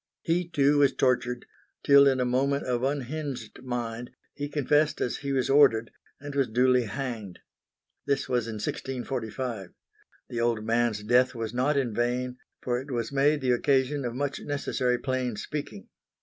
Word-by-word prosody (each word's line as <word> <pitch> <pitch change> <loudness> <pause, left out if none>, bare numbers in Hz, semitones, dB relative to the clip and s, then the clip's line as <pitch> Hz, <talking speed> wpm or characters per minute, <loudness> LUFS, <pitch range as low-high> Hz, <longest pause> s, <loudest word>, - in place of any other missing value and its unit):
He 170 +1 0
too 145 -2 +3
was 140 -2 +4
tortured, 125 -1 +1 0.4
till 140 0 +7
in 135 -1 +3
a 125 - +1
moment 135 +3 +1
of 125 -1 -1
unhinged 135 -4 -3
mind, 120 -1 -4 0.2
he 145 0 -5
confessed 150 +1 +2
as 125 - -1
he 140 -1 -4
was 130 -2 +1
ordered, 135 -6 +4 0.3
and 145 0 -7
was 140 -2 +1
duly 125 +2 +3
hanged. 110 -4 -5 0.7
This 140 -1 0
was 120 -3 0
in 115 - -5
1645. 120 -2 -4 0.6
The 115 - -3
old 115 -2 0
man's 115 -2 +1
death 125 +3 +3
was 115 -1 -4
not 135 +4 +1
in 125 -5 0
vain, 125 +2 -1 0.2
for 125 -1 0
it 140 - -12
was 120 -2 -2
made 145 +2 +2
the 130 -1 +1
occasion 135 +2 +1
of 120 -1 -3
much 140 +1 -2
necessary 130 -3 -1
plain 130 -3 -2
speaking. 150 - -6
125 Hz, 165 wpm, -27 LUFS, 120-140 Hz, 0.7 s, till